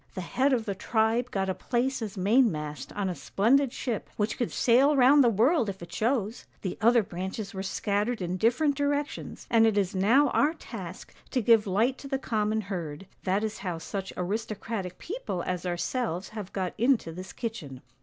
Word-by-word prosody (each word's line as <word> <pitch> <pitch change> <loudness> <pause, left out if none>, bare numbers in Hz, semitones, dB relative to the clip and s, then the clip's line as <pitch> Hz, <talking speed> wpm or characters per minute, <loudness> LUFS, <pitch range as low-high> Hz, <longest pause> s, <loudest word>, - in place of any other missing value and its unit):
The 185 - -3
head 260 +10 +1
of 235 -4 +1
the 200 - -1
tribe 225 +4 +1
got 195 -3 -1
a 190 - 0
place 250 +5 -1
as 210 -3 -5
mainmast 180 - +1
on 205 -2 -1
a 185 - -1
splendid 245 +9 +2
ship, 240 -4 -4
which 210 +1 0
could 240 - -2
sail 270 +5 +4
round 270 +3 +7
the 240 - +5
world 230 - +3
if 195 -1 -6
it 170 - -10
chose; 220 +4 -1 0.2
the 185 - -2
other 235 +1 +5
branches 190 +3 -5
were 190 - -4
scattered 205 +4 -1
in 180 0 -2
different 250 - +2
directions, 285 +1 -2
and 225 -1 +6
it 215 -2 +1
is 195 -2 +1
now 235 +10 +4
our 300 +6 +2
task 190 - -9 0.2
to 260 - 0
give 225 -2 +4
light 225 +7 +1
to 275 - -8
the 270 -1 -1
common 220 -4 0
herd, 180 -4 -5 0.2
that 195 +2 +1
is 220 0 -3
how 180 -4 -3
such 190 +3 -5
aristocratic 205 0 -3
people 370 - -4
as 180 0 -3
ourselves 180 +1 -2
have 210 -3 -7
got 185 -2 -2
into 240 -8 +2
this 185 +3 -8
kitchen.' 160 - -6
215 Hz, 190 wpm, -28 LUFS, 190-245 Hz, 0.2 s, round